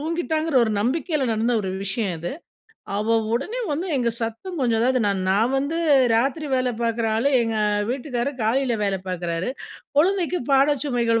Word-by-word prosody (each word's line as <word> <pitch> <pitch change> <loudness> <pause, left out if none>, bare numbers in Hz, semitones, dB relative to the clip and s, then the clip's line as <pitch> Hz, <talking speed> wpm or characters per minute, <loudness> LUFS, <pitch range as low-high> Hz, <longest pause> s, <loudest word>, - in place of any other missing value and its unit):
தூங்கிட்டாங்கிற 320 -1 -1
ஒரு 220 - -1
நம்பிக்கையில 295 - 0
நடந்த 230 +3 +1
ஒரு 190 - -3
விஷயம் 200 -2 -2
இது. 170 +8 -4 0.6
அவ 225 +2 +2 0.2
உடனே 350 - -2
வந்து 335 +6 -2
எங்க 240 -2 +1
சத்தம் 230 +12 -4
கொஞ்சம் 235 -3 +2
அதாவது 255 +1 +2
நான் 200 -2 0
நான் 215 +6 +2
வந்து 285 +4 -1 0.4
ராத்திரி 275 +7 +1
வேலை 255 -1 +1
பார்க்குற 230 -1 0
ஆளு. 235 +5 +2
எங்க 225 -1 -1 0.3
வீட்டுக்காரு 250 0 -2
காலையில 240 +3 +1
வேலை 195 -1 0
பார்க்குறாரு. 175 +1 -2 0.5
குழந்தைக்கு 360 +2 +2
பாட 275 +2 +5
சுமைகள் 235 -4 +1
245 Hz, 155 wpm, -23 LUFS, 225-290 Hz, 0.6 s, பாட